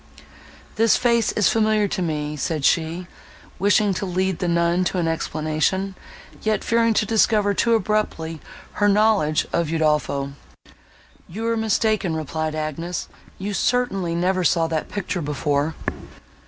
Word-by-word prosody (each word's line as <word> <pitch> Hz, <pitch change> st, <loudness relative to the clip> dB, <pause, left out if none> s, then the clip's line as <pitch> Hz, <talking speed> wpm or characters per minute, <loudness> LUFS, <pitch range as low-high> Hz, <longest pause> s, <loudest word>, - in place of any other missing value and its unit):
"This 225 Hz, +1 st, +4 dB
face 235 Hz, -2 st, +2 dB
is 210 Hz, -, +3 dB
familiar 215 Hz, -2 st, +2 dB
to 185 Hz, -, -2 dB
me," 150 Hz, -3 st, -2 dB
said 150 Hz, 0 st, -2 dB
she, 165 Hz, +2 st, +1 dB, 0.5 s
wishing 205 Hz, +1 st, +3 dB
to 190 Hz, -, -3 dB
lead 185 Hz, 0 st, -1 dB
the 180 Hz, -, -1 dB
nun 170 Hz, +1 st, +2 dB
to 185 Hz, -, -1 dB
an 170 Hz, -2 st, 0 dB
explanation, 165 Hz, +4 st, -1 dB, 0.5 s
yet 215 Hz, -2 st, 0 dB
fearing 230 Hz, -1 st, +2 dB
to 215 Hz, -, +2 dB
discover 210 Hz, -1 st, +2 dB
too 230 Hz, +3 st, +2 dB
abruptly 190 Hz, -7 st, -1 dB, 0.4 s
her 205 Hz, -, +5 dB
knowledge 205 Hz, -7 st, +3 dB
of 170 Hz, -1 st, +1 dB
Udolpho. 150 Hz, -3 st, 0 dB, 1.0 s
"You 220 Hz, +6 st, -5 dB
are 230 Hz, 0 st, +1 dB
mistaken," 215 Hz, -5 st, +1 dB
replied 155 Hz, 0 st, -3 dB
Agnes, 155 Hz, +3 st, -4 dB, 0.3 s
"you 200 Hz, +2 st, -4 dB
certainly 195 Hz, -8 st, 0 dB
never 185 Hz, +2 st, +1 dB
saw 165 Hz, -1 st, +3 dB
that 160 Hz, -1 st, -2 dB
picture 190 Hz, -2 st, -3 dB
before." 145 Hz, +1 st, -1 dB
180 Hz, 140 wpm, -22 LUFS, 160-210 Hz, 1.0 s, her